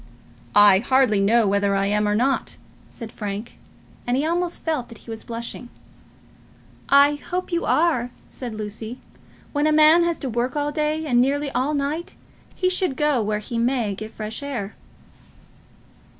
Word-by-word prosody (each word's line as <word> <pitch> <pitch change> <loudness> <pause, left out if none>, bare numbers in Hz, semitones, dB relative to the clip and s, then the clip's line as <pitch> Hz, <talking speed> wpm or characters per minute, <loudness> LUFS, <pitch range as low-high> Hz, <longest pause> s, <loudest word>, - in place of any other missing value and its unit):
"I 205 -2 +7
hardly 250 -2 +2
know 220 +3 +3
whether 200 0 +1
I 195 0 +1
am 210 +1 +1
or 210 - +1
not," 260 +5 0 0.3
said 230 -2 -9
Frank, 210 +2 -6 0.5
and 245 +1 +1
he 285 - 0
almost 345 +1 -2
felt 310 -7 -2
that 230 - -12
he 230 - -11
was 225 - -7
blushing. 235 +1 -6 1.2
"I 285 +1 +5
hope 365 +1 -3
you 340 0 -1
are," 300 -7 +2 0.2
said 240 -4 -7
Lucy. 215 +3 -6 0.5
"When 290 +1 +1
a - - +3
man 310 +2 +6
has 340 -1 0
to 275 - -4
work 240 +4 -1
all 295 0 -1
day 305 +1 -1
and 245 -4 +3
nearly 280 +2 0
all 280 +4 0
night 290 +4 -3 0.4
he 370 - 0
should 365 -7 +1
go 295 -5 +2
where 210 0 -1
he 230 +3 -4
may 235 -3 0
get 215 +3 -7
fresh 215 +3 -5
air." 240 -8 -5
250 Hz, 165 wpm, -23 LUFS, 215-300 Hz, 1.2 s, I